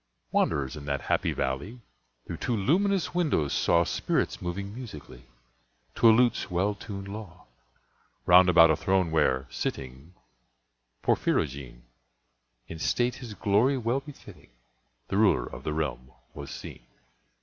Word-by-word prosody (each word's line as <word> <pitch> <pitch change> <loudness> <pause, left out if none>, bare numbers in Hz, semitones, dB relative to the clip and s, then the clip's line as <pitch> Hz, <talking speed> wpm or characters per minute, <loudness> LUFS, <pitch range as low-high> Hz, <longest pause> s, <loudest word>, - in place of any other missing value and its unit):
Wanderers 70 0 0
in 75 -2 -9
that 70 -1 -2
happy - - 0
valley, 70 - -3 0.5
Through - - -6
two 120 - -1
luminous 185 - +1
windows, 150 - +1
saw 85 0 +3
Spirits - - -1
moving 100 +3 -4
musically, 110 - -10 0.7
To 115 - +5
a - - +9
lute's 120 0 +2
well 95 +3 0
tunèd 100 -1 -8
law, 100 -3 -9 0.8
Round 90 +1 +7
about 85 -2 +7
a - - +3
throne 95 0 +1
where, 65 -4 +2
sitting 65 +7 -5 0.9
(Porphyrogene!) 65 -4 -1 0.8
In 80 - -8
state 120 +8 0
his 115 -5 -9
glory 105 +8 +2
well 120 +2 0
befitting, 145 - -14 0.6
The 95 - -1
ruler 105 -1 +3
of - - -9
the - - -2
realm 65 -5 -3 0.2
was 70 -1 -8
seen. - - -9
90 Hz, 135 wpm, -27 LUFS, 75-115 Hz, 0.9 s, a